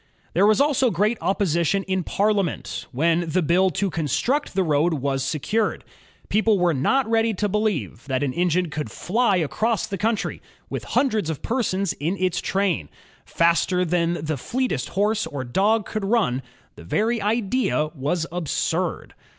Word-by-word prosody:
There 195 +4 +4
was 215 -1 +4
also 280 -3 +3
great 210 +4 +1
opposition 190 0 +1
in 190 -1 -1
Parliament 200 -2 -1
when 165 +5 +1
the 180 +3 +1
bill 180 +5 +3
to 190 +3 -1
construct 195 - -1
the 190 - +3
road 160 +1 +2
was 135 -1 -1
secured. 160 +10 -1 0.4
People 215 0 +3
were 175 -2 +2
not 230 - +1
ready 225 -1 +2
to 210 +2 0
believe 205 - -2
that 130 0 0
an 135 -3 -1
engine 175 0 +1
could 150 -1 -4
fly 220 +2 +1
across 210 +6 0
the 195 - -5
country, 220 -1 -1 0.3
with - - -4
hundreds 220 - +1
of 160 - -4
persons 200 -6 0
in 170 +7 -2
its 185 -2 0
train, 190 - 0 0.4
faster 170 +2 +2
than 170 0 +1
the 155 -1 -1
fleetest 245 - -2
horse 210 +3 0
or 140 -3 -5
dog 205 - +1
could 215 - -4
nm. 195 - +1 0.3
The - - -13
very 220 - 0
idea 210 -6 0
was 160 +3 -1
absurd. 175 -4 -2
185 Hz, 160 wpm, -23 LUFS, 160-215 Hz, 0.4 s, There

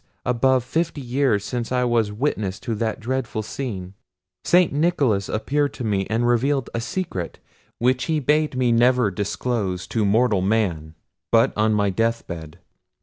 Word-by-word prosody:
above 125 +1 +2
fifty 160 +4 -2
years 125 -5 0
since 120 -2 -3
I 125 -1 +2
was 115 -4 +1
witness 105 -5 -2
to 120 -3 -3
that 110 0 -2
dreadful 120 -2 -2
scene! 100 -7 -5 0.5
St. 180 -3 +4
Nicholas 140 - +1
appeared 145 +6 0
to 125 - -6
me, 100 -3 0
and 115 +2 +1
revealed 130 +2 +1
a 115 - -2
secret, 115 - -4 0.4
which 125 +1 +1
he 160 -2 0
bade 150 -1 +1
me 125 -2 +2
never 120 -2 +3
disclose 100 -1 -2
to 115 - 0
mortal 105 0 +3
man, 90 -7 0 0.4
but 115 +3 +4
on 110 0 +2
my 100 -1 +2
death 115 +4 0
bed. 80 -1 -8
115 Hz, 155 wpm, -23 LUFS, 105-130 Hz, 0.5 s, St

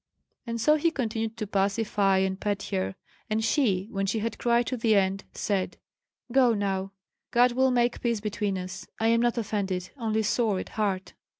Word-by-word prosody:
And 230 0 -3
so 300 +6 +4
he 335 +3 +2
continued 225 -6 -3
to 220 - -2
pacify 200 0 +1
and 190 0 0
pet 205 -1 -1
her; 190 -1 -1 0.3
and 220 +1 0
she, 210 -7 +2
when 195 0 -1
she 205 - 0
had 225 +1 -3
cried 235 0 +2
to 255 - -2
the 225 -2 +3
end, 195 0 +1
said: 195 -3 -1 0.5
"Go 250 -2 +4
now. 195 -1 -1 0.4
God 245 +1 +4
will 260 +2 +3
make 240 -1 +1
peace 235 -3 0
between 205 -1 -2
us. 185 +1 -6
I 225 +1 +3
am 230 0 +4
not 240 0 +1
offended, 200 -5 -2
only 220 -1 0
sore 215 -1 +1
at - - -6
heart." 195 -3 -2
215 Hz, 185 wpm, -27 LUFS, 195-235 Hz, 0.5 s, so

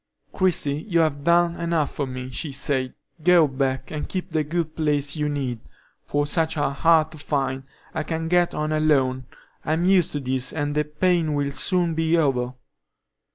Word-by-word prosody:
"Christie, 155 -6 0
you 170 -2 +3
have 145 -3 0
done 170 +1 +3
enough 170 -3 0
for 140 - -2
me," 130 0 -6
she 145 +4 -3
said. 135 -1 0 0.3
"Go 175 -2 +6
back, 130 -1 -2
and 150 -1 -4
keep 185 -2 -4
the 155 -1 +1
good 160 +1 -3
place 145 -2 0
you 150 -1 -1
need, 135 -5 -3 0.5
for 145 0 0
such 160 +1 0
are 145 -2 +1
hard 160 +2 +3
to 155 - -11
find. 135 -2 -2 0.3
I 160 - -1
can 160 +1 -3
get 175 0 +2
on 155 0 -1
alone; 135 -5 +1 0.4
I'm 160 +3 0
used 185 -3 +4
to 145 - -1
this, 130 -1 -2
and 145 -1 -2
the 150 0 +1
pain 160 0 +1
will 140 -1 -1
soon 175 +2 0
be 160 +1 +2
over." 130 -5 0
150 Hz, 180 wpm, -24 LUFS, 140-165 Hz, 0.5 s, Go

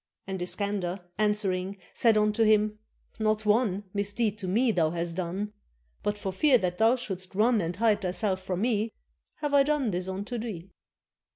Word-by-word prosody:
And 190 -1 -4
Iskander 195 0 -1 0.2
answering 200 -2 0 0.2
Said 225 -2 +4
unto 210 +1 +3
him: 215 0 +3 0.4
"Not 215 0 +1
one 210 -2 +2
Misdeed 205 +1 -1
to 190 - -4
me 230 +6 +3
hast 170 -2 0
thou 185 -1 -1
done; 200 +5 -4 0.5
But 205 0 -1
for 195 -2 -4
fear 265 +6 +5
that 180 -3 -2
thou 225 +3 +5
shouldst 190 -7 -5
run 220 +1 +3
And 170 +1 -3
hide 215 0 +2
thyself 190 +1 -1
from 185 0 -3
me, 220 -2 0 0.5
Have 295 -1 -1
I 285 - +7
done 280 -5 +1
this 180 0 -3
unto 200 +6 -4
thee. 195 -5 -6
205 Hz, 170 wpm, -28 LUFS, 185-220 Hz, 0.5 s, I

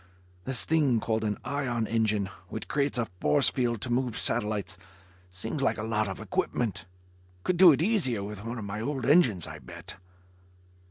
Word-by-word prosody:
This 130 -2 +1
thing 145 -7 +3
called 110 0 -1
an 105 -1 -1
ion 125 -5 -1
engine, 110 -3 +1 0.2
which - - -6
creates 140 -2 0
a 120 - +1
force 75 0 +3
field 120 -4 -1
to 125 - -3
move 125 -1 0
satellites, 105 0 -1 0.5
seems 110 +10 -4
like 135 - +1
a 110 - -4
lot 110 -1 0
of 95 - -6
equipment. 110 -5 -2 0.6
Could 180 - 0
do 180 -1 +9
it 150 +2 +2
easier 160 - +2
with 105 0 -7
one 115 +2 -5
of 110 - -5
my 100 +2 -4
old 130 0 -2
engines, 130 - +4
I - - -8
bet." - - -6
115 Hz, 175 wpm, -28 LUFS, 105-135 Hz, 0.6 s, do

